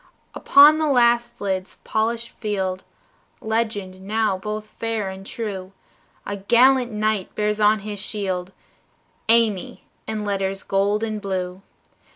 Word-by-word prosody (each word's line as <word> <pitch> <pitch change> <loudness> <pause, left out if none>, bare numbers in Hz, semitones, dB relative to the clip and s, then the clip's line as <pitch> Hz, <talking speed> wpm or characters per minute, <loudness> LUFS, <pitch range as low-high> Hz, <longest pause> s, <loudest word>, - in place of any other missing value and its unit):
Upon 295 +2 +7
the 310 - +1
last 240 -2 +2
lid's 190 -1 -2
polished 230 +2 -1
field 190 -4 -3 0.6
Legend 215 -4 -2
now 210 0 0
both 210 +3 -5
fair 220 -2 -3
and 190 0 -9
true 195 -3 -6 0.5
A 205 - -4
gallant 245 +5 +4
knight 215 -2 -1
bears 210 0 0
on 210 0 +4
his 205 0 -6
shield, 190 -3 -3 0.8
"Amy" 225 -5 +2 0.2
in 215 -1 -3
letters 195 -1 -2
gold 200 +2 +1
and 215 -2 -3
blue. 185 -2 -3
210 Hz, 125 wpm, -22 LUFS, 195-225 Hz, 0.8 s, Upon